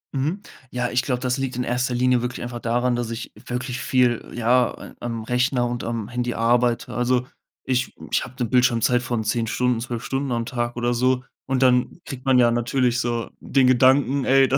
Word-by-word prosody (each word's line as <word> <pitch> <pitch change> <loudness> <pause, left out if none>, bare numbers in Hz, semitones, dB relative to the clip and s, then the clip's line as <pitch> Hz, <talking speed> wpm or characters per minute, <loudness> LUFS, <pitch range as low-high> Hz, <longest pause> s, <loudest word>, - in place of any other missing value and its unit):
Mhm, 155 +9 -1 0.3
ja, 125 -1 -2
ich 125 - +2
glaube, 125 0 -2
das 125 -1 0
liegt 135 -2 -2
in 125 - -1
erster 125 +1 -1
Linie 125 0 +3
wirklich 125 0 -4
einfach 120 0 -5
daran, 120 +2 0
dass 120 -1 -2
ich 115 0 -6 0.2
wirklich 125 +1 -3
viel, 125 -1 +1
ja, 120 +1 +3 0.2
äh, - - -16
am 115 -2 -4
Rechner 125 +2 +1
und 120 0 -4
am 115 -2 -3
Handy 120 0 -2
arbeite. 120 +1 +1
Also, 125 +1 +1 0.4
ich 130 -1 -1 0.2
ich - - +2
habe 130 0 -10
'ne 120 - +1
Bildschirmzeit 125 -1 +3
von 120 -3 -2
10 115 +1 0
Stunden, 125 +1 0
12 120 -1 -4
Stunden 135 0 -2
am 115 -1 -1
Tag 120 -1 -3
oder 120 0 0
so, 125 +1 +1 0.2
und 135 0 +1
dann 125 +5 +2
kriegt 130 -1 -8
man 130 -1 +4
ja 120 -1 +5
natürlich 120 +1 +1
so 120 -2 -2
den 135 -2 +2
Gedanken: 130 +2 +4
„Ey, 135 0 +5
da 135 - +2
125 Hz, 205 wpm, -23 LUFS, 120-130 Hz, 0.4 s, ja